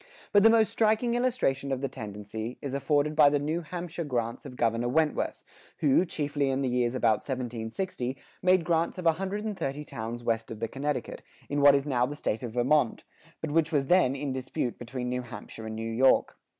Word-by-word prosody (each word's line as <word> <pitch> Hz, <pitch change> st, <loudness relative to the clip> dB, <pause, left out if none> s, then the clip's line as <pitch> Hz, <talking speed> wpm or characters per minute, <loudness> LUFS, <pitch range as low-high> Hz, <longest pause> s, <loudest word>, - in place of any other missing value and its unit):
[77:1] -, -, -24 dB, 0.3 s
But 205 Hz, -, +7 dB
the 225 Hz, -, +7 dB
most 225 Hz, -1 st, +4 dB
striking 220 Hz, +2 st, +2 dB
illustration 240 Hz, -, 0 dB
of 135 Hz, -1 st, -1 dB
the 140 Hz, -, 0 dB
tendency, 110 Hz, -1 st, -6 dB
is 140 Hz, -2 st, -5 dB
afforded 145 Hz, +2 st, +1 dB
by 150 Hz, -2 st, +7 dB
the 145 Hz, -, +2 dB
"New 155 Hz, +4 st, -1 dB
Hampshire 170 Hz, +1 st, -5 dB
grants" 120 Hz, -2 st, -3 dB
of 125 Hz, -, -10 dB
Governor 115 Hz, 0 st, +1 dB
Wentworth, 155 Hz, +3 st, 0 dB, 0.3 s
who, 150 Hz, +4 st, +3 dB
chiefly 145 Hz, -4 st, -1 dB
in 135 Hz, +1 st, 0 dB
the 130 Hz, -, +1 dB
years 125 Hz, 0 st, +1 dB
about 110 Hz, -4 st, +3 dB
1760, 125 Hz, +2 st, -4 dB, 0.2 s
made 180 Hz, -2 st, +4 dB
grants 170 Hz, 0 st, +1 dB
of 180 Hz, -, -6 dB
a 165 Hz, -, +7 dB
hundred 195 Hz, +5 st, -4 dB
and 215 Hz, -2 st, -2 dB
thirty 145 Hz, -4 st, -3 dB
towns 120 Hz, -2 st, -6 dB
west 115 Hz, -1 st, -1 dB
of 110 Hz, -, -7 dB
the 115 Hz, -, -1 dB
Connecticut, 145 Hz, +4 st, -3 dB, 0.3 s
in 145 Hz, 0 st, 0 dB
what 140 Hz, 0 st, +8 dB
is 140 Hz, 0 st, 0 dB
now 125 Hz, -4 st, +1 dB
the 145 Hz, -, -5 dB
State 110 Hz, -6 st, -2 dB
of 120 Hz, -3 st, -5 dB
Vermont, 125 Hz, +1 st, +2 dB, 0.4 s
but 160 Hz, -, -3 dB
which 165 Hz, +1 st, +2 dB
was 145 Hz, -3 st, +2 dB
then 140 Hz, -4 st, +4 dB
in 140 Hz, -1 st, -3 dB
dispute 130 Hz, -2 st, -3 dB
between 125 Hz, +1 st, -5 dB
New 125 Hz, 0 st, -1 dB
Hampshire 115 Hz, -1 st, -9 dB
and 110 Hz, -, -5 dB
New 115 Hz, +1 st, -4 dB
York. 130 Hz, +4 st, +3 dB
135 Hz, 210 wpm, -28 LUFS, 120-160 Hz, 0.4 s, what